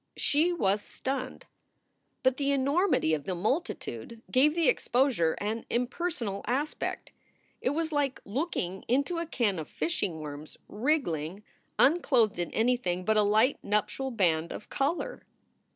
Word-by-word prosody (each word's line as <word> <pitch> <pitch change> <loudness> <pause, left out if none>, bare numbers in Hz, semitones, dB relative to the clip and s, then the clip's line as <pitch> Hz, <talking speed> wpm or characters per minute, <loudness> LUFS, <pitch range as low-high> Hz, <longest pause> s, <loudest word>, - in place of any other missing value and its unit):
She 315 +5 +3
was 205 - +1
stunned. 260 +3 -4 0.8
But 260 0 +3
the 280 -1 +1
enormity 280 - +2
of 150 -2 -1
the 185 - -2
multi 220 - 0
tude 225 - -8
gave 290 +4 +4
the 335 -4 +2
exposure 240 - +2
an 220 +3 -2
impersonal 245 - -2
aspect. 285 +5 -2 0.5
It - - +1
was 320 +3 -1
like 285 -3 0
looking 200 - -2
into 280 +7 +1
a 335 - -3
can 210 - 0
of 155 - -6
fishing 190 - -2
worms 150 0 -8
wriggling 205 - -1 0.3
unclothed 260 - +4
in 175 - -1
anything 220 -7 0
but 220 - +3
a 215 - +5
light 215 +6 +3
nuptial 210 +6 0
band 170 -8 +1
of - - -8
color. 325 - -1
245 Hz, 140 wpm, -29 LUFS, 195-285 Hz, 0.8 s, a